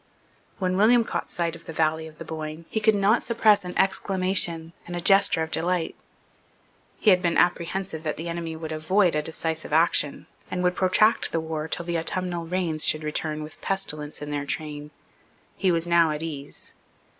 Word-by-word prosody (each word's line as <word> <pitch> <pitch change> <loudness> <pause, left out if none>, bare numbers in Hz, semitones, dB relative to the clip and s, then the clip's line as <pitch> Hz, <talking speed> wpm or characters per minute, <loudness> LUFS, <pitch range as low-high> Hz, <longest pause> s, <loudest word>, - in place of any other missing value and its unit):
When 185 -1 0
William 230 +4 +5
caught - - -4
sight 170 -1 -2
of 165 - -14
the 165 - -7
valley 160 0 0
of 155 -1 -14
the - - -8
Boyne, 155 +1 -6
he 220 - 0
could 215 0 +4
not 205 +3 +3
suppress 215 -3 +3
an 180 0 -6
exclamation 185 -4 +1
and 175 - -5
a - - -2
gesture 195 -2 +4
of 160 - -6
delight. 175 0 -1 1.0
He 215 - +4
had 180 -1 +4
been 170 -2 +1
apprehensive 175 -1 0
that 155 -2 -3
the 165 +3 -5
enemy 170 -1 -4
would 160 0 -6
avoid 175 +4 +2
a 150 - +1
decisive 160 0 -4
action, 155 -2 +2 0.2
and 180 - -2
would 180 0 +2
protract 215 +4 +3
the 165 - 0
war 160 -1 -4
till 170 +1 -2
the 170 -1 -1
autumnal 175 0 -2
rains 170 -3 -1
should 155 0 +1
return 155 0 -2
with 155 - -11
pestilence 155 -7 -3
in 150 - -6
their 145 -1 -3
train. 150 -1 -3 0.7
He 190 -2 +2
was 165 -1 0
now 170 -1 +4
at 150 +1 -3
ease. 145 -3 -7
170 Hz, 190 wpm, -25 LUFS, 155-185 Hz, 1.0 s, William